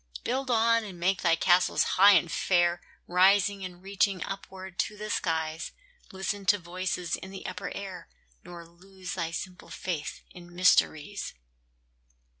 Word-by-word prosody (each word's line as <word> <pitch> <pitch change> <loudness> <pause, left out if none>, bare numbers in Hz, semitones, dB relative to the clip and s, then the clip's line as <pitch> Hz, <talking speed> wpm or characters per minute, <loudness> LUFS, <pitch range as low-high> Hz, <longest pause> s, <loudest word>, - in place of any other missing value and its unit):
Build 260 +2 -2
on, 230 -1 +3
and 190 -5 -9
make 185 +2 +1
thy 170 -2 +4
castles 175 +2 +3
high 200 +2 +6
and 170 -4 +3
fair, 175 0 +2 0.2
Rising 195 +2 +3
and 180 -1 -8
reaching 195 -2 0
upward 190 -2 -8
to 210 - -1
the 210 0 -5
skies; 160 -2 -2 0.4
Listen 195 +1 -3
to 205 - +5
voices 180 -1 -3
in 190 - -9
the 195 0 -9
upper - - -5
air, 185 -4 -7 0.3
Nor 170 -1 -10
lose 185 +1 -9
thy 170 -2 -2
simple 180 +2 -7
faith 165 -5 -5
in 175 -1 -13
mysteries. 185 - +2
185 Hz, 145 wpm, -28 LUFS, 175-195 Hz, 0.4 s, high